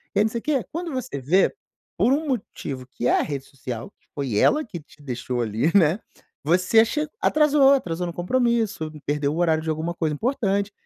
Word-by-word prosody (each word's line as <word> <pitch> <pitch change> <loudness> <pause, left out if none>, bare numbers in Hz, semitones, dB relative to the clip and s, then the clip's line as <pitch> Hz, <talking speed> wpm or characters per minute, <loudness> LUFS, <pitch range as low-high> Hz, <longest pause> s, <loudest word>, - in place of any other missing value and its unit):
e - - +3
aí - - +5
não 220 - -1
sei 235 - -2
quê, 280 -3 0
quando 335 +1 -4
você 255 - -4
vê, 165 +9 +3 0.4
por 260 - +4
um 310 +2 -1
motivo 145 - -4
que 130 -2 -3
é - - +4
a - - +2
rede 140 -2 -4
social 125 -4 -7
que - - -38
foi 135 -7 -2
ela 305 - +4
que 200 -7 -7
te 150 0 -20
deixou 125 -2 -3
ali, 115 +8 0
né, 175 +1 +4 0.4
você 180 +8 +4
che 300 +6 -2
atrasou, 295 -2 +5
atrasou 180 -10 -1
no 170 - -5
compromisso, 220 -4 0
perdeu 145 0 0
o - - -4
horário 160 -2 +2
de 160 - -3
alguma 160 +2 -2
coisa 160 -3 -1
importante. 200 - 0
175 Hz, 205 wpm, -24 LUFS, 145-240 Hz, 0.4 s, aí